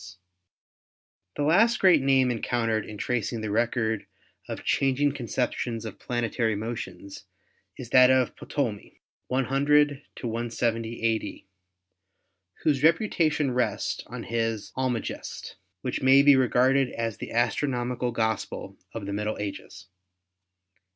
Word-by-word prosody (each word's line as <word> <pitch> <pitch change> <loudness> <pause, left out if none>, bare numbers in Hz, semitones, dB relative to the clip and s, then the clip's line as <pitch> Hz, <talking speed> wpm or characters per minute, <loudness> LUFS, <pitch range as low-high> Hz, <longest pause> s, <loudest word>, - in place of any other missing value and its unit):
70 85 - -11
ASTRONOMY 90 0 -15 1.3
The - - +5
last 230 +2 +4
great 180 -6 +5
name 135 -2 +3
encountered 115 -2 -1
in 105 - -8
tracing 115 0 -2
the 110 -1 -3
record 110 -1 0 0.4
of - - -5
changing 135 +1 +2
conceptions 120 -2 -3
of 110 - -8
planetary 115 -2 -1
motions 100 -4 -6 0.5
is 120 -2 -9
that 130 0 +7
of 130 -2 +2
Ptolemy 120 -9 -4 0.3
(100 140 +2 +2 0.2
170 115 -1 -2
a.d.), 110 -3 -1 1.2
whose 145 -4 +2
reputation 160 -4 +2
rests 125 0 -1
on - - -7
his 115 -2 -2
"Almagest," 130 -3 -4 0.2
which 125 - -3
may 135 +1 +6
be 145 -1 +7
regarded 130 +1 +3
as 115 -2 -3
the - - -7
astronomical 120 0 0
gospel 110 -2 -3 0.2
of 110 -3 -5
the 100 - -4
Middle 105 +1 -2
Ages. 100 -3 -7
120 Hz, 120 wpm, -26 LUFS, 110-135 Hz, 1.3 s, that